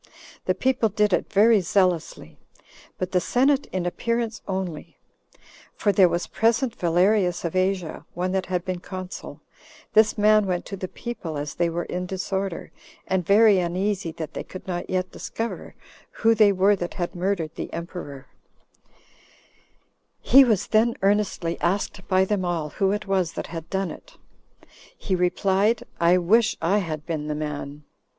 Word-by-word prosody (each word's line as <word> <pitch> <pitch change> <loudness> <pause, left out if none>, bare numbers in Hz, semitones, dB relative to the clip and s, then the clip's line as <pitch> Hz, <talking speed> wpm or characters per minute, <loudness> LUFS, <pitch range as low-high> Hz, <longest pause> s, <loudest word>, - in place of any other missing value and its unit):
The - - +1
people 255 -4 +1
did 210 -1 +1
it - - 0
very 215 +1 +5
zealously, 180 -2 -1 0.6
but 185 0 -3
the 180 - +2
senate 270 +6 +2
in 185 -2 -3
appearance 230 +4 -2
only; 185 -5 -4 0.8
for 205 - +1
there 190 -3 +5
was 175 +1 -1
present 230 +2 +1
Valerius 180 +1 +2
of 170 - -3
Asia, 185 -3 -1
one 180 +1 -1
that 190 -1 -1
had 180 -1 -2
been 185 -1 -3
consul; 185 0 -8 0.5
this 220 0 +4
man 210 0 +4
went 180 -1 -2
to 195 - -6
the 185 -1 -5
people, 180 -9 -6
as 145 +1 -4
they 170 -1 0
were 170 +1 -2
in 180 +1 -4
disorder, 190 -1 -3 0.3
and 190 -1 0
very 205 +2 +5
uneasy 180 +1 -1
that 160 -1 -6
they - - -5
could 185 - -10
not 175 -2 -4
yet 185 0 -1
discover 230 +1 -6 0.3
who 225 0 +2
they 215 -2 +5
were 195 +2 +3
that 175 -2 -5
had 175 -2 -3
murdered 175 -3 -2
the - - -6
emperor; 165 -5 -7 1.9
he 270 +1 +7
was 220 -7 +2
then 230 +2 +2
earnestly 195 -4 +1
asked 190 +1 -1
by 185 0 +3
them 200 -1 -1
all 170 -4 -2
who 195 +5 0
it 210 +1 -2
was 190 -4 0
that - - -4
had 165 -1 -6
done 190 -2 -1
it. - - -13 0.8
He 195 - -3
replied, 190 +4 +1 0.2
"I 170 +2 +5
wish 215 +6 +3
I 185 +6 +2
had 155 -5 -4
been 155 -3 -3
the 150 - -2
man." 150 -1 -5
185 Hz, 160 wpm, -24 LUFS, 175-210 Hz, 1.9 s, he